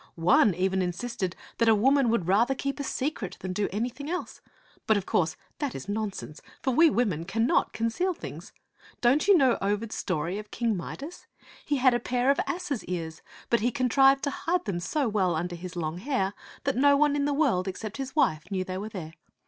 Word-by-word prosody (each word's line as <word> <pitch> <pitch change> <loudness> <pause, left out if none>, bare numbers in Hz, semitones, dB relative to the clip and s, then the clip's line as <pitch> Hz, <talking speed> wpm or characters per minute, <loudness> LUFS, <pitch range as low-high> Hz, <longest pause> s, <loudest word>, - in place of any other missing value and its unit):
One 180 +3 +4
even 190 +1 +1
insisted 185 +1 -3 0.2
that 230 -1 +4
a 220 - +6
woman 265 +4 +3
would 225 -7 0
rather 230 +8 +3
keep 275 +2 -3
a - - -2
secret 265 - -3
than 185 0 -4
do 200 +2 -1
anything 250 - -3
else; 360 +1 -4 0.5
but 220 - +4
of 195 - -3
course 165 -3 0 0.2
that 285 -4 -2
is 135 - -7
nonsense, 205 -7 -4 0.2
for 265 - +1
we 325 +6 +6
women 210 - 0
cannot 225 +8 +1
conceal 330 +12 -1
things. - - -9 0.5
Don't 265 +8 +3
you 400 -3 +7
know 260 -6 +3
Ovid's 205 +3 -1
story 170 +6 -2
of 210 0 -9
King 230 -2 0
Midas? 285 - -7 0.4
He 290 - 0
had 255 -1 +4
a 240 - +1
pair 250 +2 +1
of 280 - 0
asses' 340 -9 -3
ears, 165 -3 -5 0.3
but 235 - +4
he 240 - +1
contrived 270 +1 +4
to 285 - 0
hide 350 +5 -1
them 195 -5 -2
so 270 - -1
well 190 -6 +1
under 175 +2 -3
his 180 +1 -8
long 165 0 -3
hair 205 -4 -1 0.3
that 275 - 0
no 280 +3 +5
one 295 0 +3
in 285 -1 +1
the 290 - +1
world 255 -11 +1
ex 190 - -5
cept 215 +1 -6
his 270 0 -5
wife 155 - +1
knew 190 -2 -1
they 185 0 -5
were 210 +2 -5
there. 165 -6 -7
225 Hz, 210 wpm, -27 LUFS, 185-275 Hz, 0.5 s, you